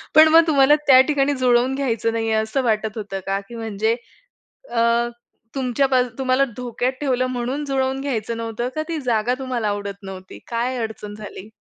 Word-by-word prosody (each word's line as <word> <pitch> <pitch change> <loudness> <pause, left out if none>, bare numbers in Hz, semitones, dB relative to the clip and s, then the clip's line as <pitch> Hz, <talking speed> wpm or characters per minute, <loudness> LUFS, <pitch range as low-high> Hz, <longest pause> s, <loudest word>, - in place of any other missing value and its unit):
पण 315 +1 +9
मग 325 +1 +6
तुम्हाला 290 -1 +5
त्या 260 -2 +8
ठिकाणी 290 -1 +2
जुळवून 250 +1 +3
घ्यायचं 230 -4 -1
नाहीये 225 -1 -1
असं 220 +5 0
वाटत 220 -1 0
होतं 205 -2 -4
का? 195 0 0
की 235 - -9
म्हणजे 220 0 -1 0.8
अ, 230 -1 +1 0.7
तुमच्यापा 260 0 +2 0.2
तुम्हाला 260 0 +2
धोक्यात 250 +1 -2
ठेवलं 255 -3 +1
म्हणून 255 +3 -3
जुळवून 265 -1 -1
घ्यायचं 235 -5 -3
नव्हतं 230 +1 -3
का? 310 - -1
ती 330 -1 -2
जागा 240 -2 +1
तुम्हाला 250 -5 -2
आवडत 200 0 -4
नव्हती? 190 -1 -9
काय 240 +2 -1
अडचण 215 -2 -6
झाली? 210 -1 -9
245 Hz, 165 wpm, -21 LUFS, 220-265 Hz, 0.8 s, पण